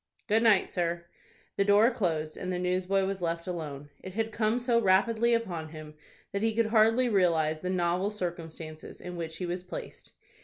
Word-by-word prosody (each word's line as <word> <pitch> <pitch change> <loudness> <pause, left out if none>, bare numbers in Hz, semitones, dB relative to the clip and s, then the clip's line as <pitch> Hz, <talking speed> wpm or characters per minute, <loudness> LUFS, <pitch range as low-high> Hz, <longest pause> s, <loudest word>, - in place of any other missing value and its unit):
"Good 220 0 +3
night, 220 -4 +5
sir." 170 -1 -2 0.5
The 200 - +4
door 205 +4 +5
closed, 160 -9 -1
and 185 - -4
the 180 - -1
newsboy 185 +2 +1
was 195 -1 -3
left 170 -1 -2
alone. 145 -5 -6
It 185 0 -9
had 225 0 -1
come 220 +1 +1
so 240 -1 +2
rapidly 225 +4 +3
upon 175 -9 -3
him, 155 -1 -10 0.4
that 200 - -2
he 225 0 +1
could 230 0 +3
hardly 225 +3 +4
realize 165 -7 +2
the 180 - -4
novel 180 +1 +1
circumstances 165 -5 -6
in 180 0 -7
which 160 -1 -5
he 180 - -3
was 175 +1 -3
placed. 180 - -9
185 Hz, 185 wpm, -29 LUFS, 170-215 Hz, 0.5 s, night